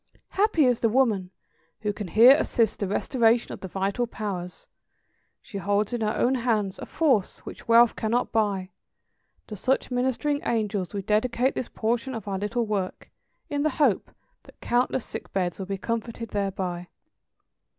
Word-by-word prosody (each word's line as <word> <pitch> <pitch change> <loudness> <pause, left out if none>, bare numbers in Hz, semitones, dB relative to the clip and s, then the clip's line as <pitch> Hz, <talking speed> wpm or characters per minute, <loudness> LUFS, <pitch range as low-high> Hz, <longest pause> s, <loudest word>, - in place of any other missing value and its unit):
Happy 390 -8 +3
the 230 -1 0
woman 215 -7 +2 0.5
who 210 -1 -1
can 205 -1 -6
here 225 +8 +7
assist 230 -7 +1
the 200 - -1
restoration 230 +3 +2
of - - -8
the 190 - -6
vital 195 +6 -1
powers; 185 -6 -6 0.8
she 200 - -7
holds 205 +4 0
in 240 - -2
her 215 -1 0
own 250 - +2
hands 225 -6 0
a - - -7
force 265 - +1
which - - -10
wealth 235 0 +6
cannot 230 +3 0
buy. 200 -4 0 0.7
To 215 - -7
such 260 +6 0
ministering 260 +4 0
angels 210 -5 -1
we 200 -2 -4
dedicate 235 +5 +1
this 255 - -4
portion 235 +3 -2
of 220 -3 -7
our 195 -1 -2
little 220 +4 -1
work, 200 -4 -3 0.4
in 285 -1 -2
the 310 - +2
hope 270 -10 +2 0.3
that - - -19
countless 245 0 0
sick - - -8
beds 180 -2 -1
will 190 - -5
be 195 0 -3
comforted 230 +3 -4
thereby. 185 -3 -3
220 Hz, 160 wpm, -26 LUFS, 195-245 Hz, 0.8 s, here